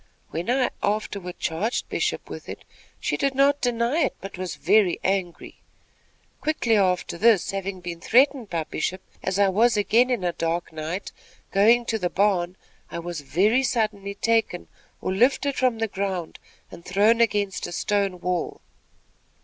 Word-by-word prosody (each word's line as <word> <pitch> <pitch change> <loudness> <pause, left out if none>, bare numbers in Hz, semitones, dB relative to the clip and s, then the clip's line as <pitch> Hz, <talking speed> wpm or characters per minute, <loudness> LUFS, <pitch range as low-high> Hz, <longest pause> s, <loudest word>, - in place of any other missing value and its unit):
When 170 +7 -4
I 255 0 +2
afterward 200 -3 -2
charged 195 +9 -2
Bishop - - -2
with - - -9
it, - - -8 0.4
she - - -1
did 275 -1 0
not 280 +1 +3
deny 240 +4 +1
it, 280 - +1
but 195 +1 -8
was 185 -1 -5
very 195 0 +3
angry. 185 -3 -2 0.8
Quickly 295 -7 +1
after 180 -3 +1
this, 220 -4 +4
having 195 -1 -4
been 170 -1 -6
threatened 255 0 +3
by 165 -2 -1
Bishop, 185 +5 -3 0.2
as 190 0 -1
I 200 -1 +4
was 225 +4 +3
again 230 +4 +3
in 245 -7 0
a 175 -1 0
dark 165 0 -2
night, 160 +5 -4 0.4
going 230 +5 +4
to 225 -1 -1
the 180 -2 -1
barn, 185 -2 +1 0.3
I - - -6
was 170 -2 -5
very 200 - +2
suddenly 215 -6 -1
taken 225 -5 0 0.3
or 185 - -1
lifted 270 +6 +2
from 255 -3 +1
the 225 0 0
ground, 190 -4 -4 0.3
and 170 - -11
thrown 210 +6 +3
against 205 -4 0
a - - -8
stone 195 0 -1
wall. 180 -1 -2
200 Hz, 160 wpm, -24 LUFS, 180-230 Hz, 0.8 s, this